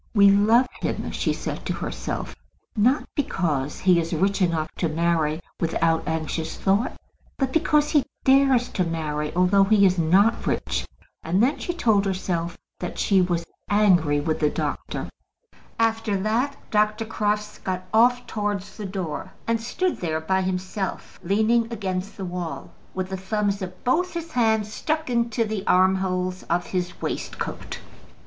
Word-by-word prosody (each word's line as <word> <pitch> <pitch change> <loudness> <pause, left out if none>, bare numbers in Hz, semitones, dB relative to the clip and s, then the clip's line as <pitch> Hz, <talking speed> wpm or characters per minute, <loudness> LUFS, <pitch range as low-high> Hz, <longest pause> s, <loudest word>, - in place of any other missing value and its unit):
"We 200 -1 +7
love 220 +5 +5 0.2
him," - - -2
she - - 0
said - - -4
to - - 0
herself, - - -4 0.4
"not 245 +7 +3
because 155 - -1
he 180 -2 +5
is 165 0 -2
rich 195 +4 +1
enough 165 -3 +1
to 165 - 0
marry 160 -1 +1 0.2
without 165 0 +1
anxious 160 0 -2
thought, 200 +5 +1 0.4
but 265 -2 -1
because 300 -2 +3
he 295 -4 +4 0.2
dares 265 -2 +4
to 185 - 0
marry 155 -3 -2
although 185 +2 +4
he 200 0 +5
is 185 -1 +3
not 195 +8 +3
rich." - - -1 0.3
And 180 +6 +1
then 270 +5 +2
she - - -2
told 215 -10 +3
herself 180 -3 -2 0.2
that 180 - -5
she 195 -2 +3
was 175 -2 0 0.2
angry 180 -8 +4
with 155 +2 -1
the 150 - +3
doctor. - - -3 0.7
After 225 -2 +1
that 235 +8 0
Dr. 215 +1 +2
Crofts 210 -1 -2
got 185 -1 -3
off 245 +2 +4
towards 205 -2 -3
the 210 - -5
door, 185 -5 -5
and 230 0 0
stood 360 +10 -1
there 160 -2 -2
by 190 +4 0
himself, 185 +1 -3
leaning 220 +5 +2
against 195 -3 -3
the 195 - -4
wall, 175 -2 -5 0.2
with 185 0 -2
the 190 - -3
thumbs 200 +1 -1
of 185 -1 -7
both 350 +8 +1
his 335 -1 -5
hands 220 -3 +1
stuck 310 0 -2
into 235 -1 +1
the 215 -2 -3
armholes 185 0 +2
of 175 +1 +1
his 180 -1 -3
waistcoat. - - -4
195 Hz, 155 wpm, -24 LUFS, 175-225 Hz, 0.7 s, We